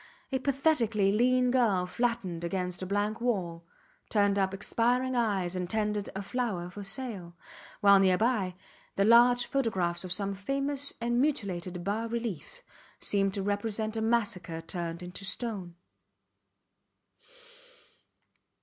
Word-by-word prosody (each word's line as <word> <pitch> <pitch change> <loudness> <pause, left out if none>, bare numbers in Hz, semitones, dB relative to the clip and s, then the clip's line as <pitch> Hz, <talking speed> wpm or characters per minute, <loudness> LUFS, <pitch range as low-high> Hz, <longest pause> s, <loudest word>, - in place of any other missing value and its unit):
A 265 - 0
pathetically 255 -8 +2
lean 250 +3 +3
girl 220 -8 +2
flattened 195 -5 -2
against 180 +1 -2
a 185 - -4
blank 205 +3 -1
wall, 180 -9 -1 0.5
turned 200 -2 +2
up 190 -1 +1
expiring 245 +6 0
eyes 195 -7 0
and 180 -1 -3
tendered 210 -1 -1
a 195 - -3
flower 200 -6 -2
for 205 +3 -8
sale; 195 -5 -4 0.5
while, 200 -1 +7
near 185 -1 +4
by, 215 -5 +1 0.4
the 195 - +2
large 240 +2 +6
photographs 185 -10 -1
of 185 - -6
some 195 +2 -1
famous 275 +7 -1
and 240 +1 +1
mutilated 185 - -2
bas 215 +4 -2
reliefs 235 - -4 0.3
seemed 195 -1 +1
to 195 - -2
represent 215 +2 -2
a 220 - -1
massacre 210 -7 0
turned 170 +1 -5
into 180 +2 -7
stone. 195 -4 -3
205 Hz, 130 wpm, -29 LUFS, 185-235 Hz, 0.5 s, while